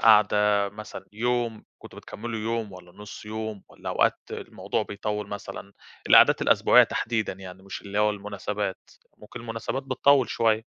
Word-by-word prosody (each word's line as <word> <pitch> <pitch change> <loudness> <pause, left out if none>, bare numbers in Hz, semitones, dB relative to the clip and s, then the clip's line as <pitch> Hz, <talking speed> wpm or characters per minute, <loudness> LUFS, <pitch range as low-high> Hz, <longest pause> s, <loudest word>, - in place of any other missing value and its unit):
قاعدة، 105 -2 +5
مثلًا 105 +1 -9
يوم، 120 0 -1
كنتم - - -12
بتكملوا 115 +1 -6
يوم 115 -2 -2
والّا 90 -1 -13
نُص 105 +2 -10
يوم 110 -2 -5
والّا - - -9
أوقات - - +2
الموضوع - - -3
بيطوِّل 105 0 -4
مثلًا؟ 100 -1 -7 0.4
القعدات - - +7
الأسبوعية - - +6
تحديدًا 110 -2 -1
يعني، 95 0 -11
مش 100 - -7
اللي 100 +1 -4
هو 105 0 +4
المُناسبات، 105 -1 -4 0.3
ممكن 105 - -10
المُناسبات 115 +3 -4
بتطوِّل 140 -1 +3
شوية. 110 -1 +1
105 Hz, 145 wpm, -26 LUFS, 100-115 Hz, 0.4 s, القعدات